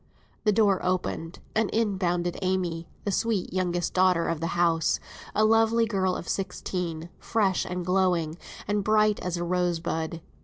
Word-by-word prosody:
The 210 - +5
door 205 -2 +3
opened 180 -2 -2 0.2
and 220 -1 +1
in 215 -3 0
bounded 175 -1 0
Amy, 180 -3 -1 0.2
the 200 - -1
sweet 210 -2 0
youngest 175 -2 -1
daughter 180 -2 +3
of 165 -2 -1
the 165 - -1
house, 165 -2 +2 0.4
a 215 - +4
lovely 225 +1 +4
girl 190 -4 0
of - - -6
sixteen, 180 -3 -3
fresh 200 -5 +1
and 180 -1 -4
glowing, 180 -3 +1 0.3
and 205 0 0
bright 215 0 +3
as 180 -1 -3
a 175 - -2
rosebud. 170 -2 -1
180 Hz, 155 wpm, -27 LUFS, 170-205 Hz, 0.4 s, The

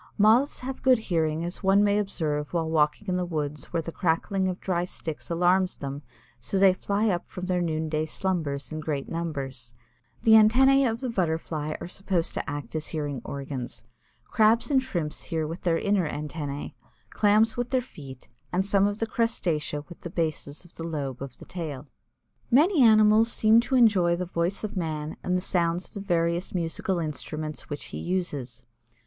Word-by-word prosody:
Moths 225 +7 +4
have 260 +1 -5
good 260 -1 +5
hearing 165 -6 -1
as 175 - -6
one 195 +2 +4
may 205 0 +3
observe 155 -7 -2
while 165 -2 0
walking 160 +5 +1
in 180 -1 0
the 180 - 0
woods 150 -4 -3
where 165 -2 -2
the 165 - -5
crackling 185 +3 0
of 180 - -4
dry 175 -2 -1
sticks 160 -3 -6
alarms 180 +2 +2
them 140 0 -5 0.4
so 115 +12 -2
they 190 -1 +6
fly 200 +3 0
up 175 -3 -2
from 180 - -6
their 180 -1 0
noonday 155 -2 -1
slumbers 155 -6 -2
in 155 - -4
great 150 -3 -3
numbers. 135 -8 -5 0.5
The 225 - +4
antennæ 255 +5 +6
of 225 +2 -3
the 255 - -2
Butterfly 160 -5 -1
are - - -6
supposed 180 -2 -1
to - - -3
act 145 -4 -6
as 155 -1 -3
hearing 145 -4 -3
organs. 130 -5 -6 0.4
Crabs 225 +5 +3
and 265 -2 +4
Shrimps 175 -12 -4
hear 160 -3 -2
with 165 +4 -6
their 170 -2 +2
inner 195 -4 +1
antennæ, 145 -1 -5 0.4
Clams 215 +2 +3
with 245 0 -2
their 260 - +2
feet, 140 - -11 0.2
and 185 +2 +1
some 200 0 +3
of 205 0 -2
the 225 - -1
crustacea 175 -11 -1
with 175 - -13
the 175 - -6
bases 160 -2 -3
of 175 - -19
the 165 - -5
lobe 140 -6 -4
of 135 -3 -7
the - - -12
tail. 155 -6 -6 0.6
Many 300 +6 +4
animals 215 0 +6
seem 220 +1 +5
to 250 +3 0
enjoy 200 -8 +5
the 180 +1 -3
voice 175 +3 -1
of 215 0 -4
man 155 -3 -3
and 180 0 0
the - - -2
sounds 175 -1 0
of - - -25
the 200 - -4
various 170 -1 0
musical 175 +2 -1
instruments 155 -1 -5
which 145 - -5
he - - -4
uses. 160 -9 -3
175 Hz, 185 wpm, -26 LUFS, 155-205 Hz, 0.6 s, they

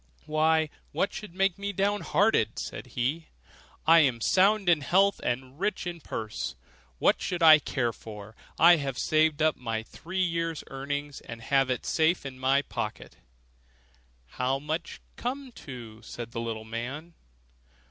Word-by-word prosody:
'Why, 155 0 +2 0.2
what 200 - 0
should 205 -5 -8
make 195 -1 +1
me 200 0 -2
down 200 +2 0
hearted?' 155 - +2
said - - -6
he; 145 +7 -1 0.6
'I 165 +1 +8
am 130 -7 +3
sound 195 - +3
in 170 -4 +4
health 195 +7 +3
and 130 +3 -3
rich 205 +1 -1
in 175 -1 -4
purse, 110 -5 -4 0.4
what - - +3
should 175 -2 -2
I 155 -1 +9
care 120 -5 -1
for? 105 0 -10 0.2
I 170 +1 +7
have 135 -3 -3
saved 155 -1 +2
up 155 - +3
my 115 -3 -3
three 185 +10 -3
years' 165 -2 -1
earnings 145 +1 -4
and 115 -1 -9
have 135 +3 +2
it 125 - 0
all - - -8
safe 160 0 +2
in 130 -1 -7
my 135 +2 +3
pocket.' - - -5 1.1
'How 125 - -1
much 155 +4 -4
may - - -37
it - - -36
come 260 +2 -3
to?' 120 - -10
said 120 -1 -8
the 115 - -4
little 110 -1 -4
man. 130 +9 -6
150 Hz, 165 wpm, -28 LUFS, 125-175 Hz, 1.1 s, I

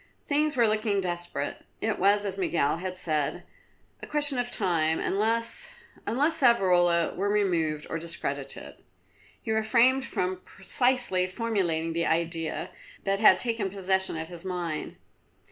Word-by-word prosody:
Things 295 -1 +1
were 235 -2 +5
looking 215 -1 +1
desperate. 175 -5 -4 0.2
It 220 -1 -1
was, 205 +2 +3
as 195 -2 -3
Miguel 165 -6 0
had 185 +1 -5
said, 155 -5 -1 0.6
a - - -8
question 290 -3 0
of 245 0 -1
time, 165 -8 +1
unless, 230 - 0 0.4
unless 295 +7 +1
Savrola 180 -8 +3
were 200 +2 -1
removed 165 -7 0
or 165 - -3
discredited. 170 +1 -3 0.6
He 220 - -4
refrained 235 +4 +3
from 185 -6 -2
precisely 240 -3 0
formulating 185 -6 -1
the 170 0 0
idea 165 0 -1 0.3
that 195 0 0
had 205 -4 +7
taken 225 -1 -1
possession 190 -2 -1
of 160 +1 -5
his 175 -1 -9
mind. 175 -4 -4
190 Hz, 135 wpm, -27 LUFS, 170-230 Hz, 0.6 s, had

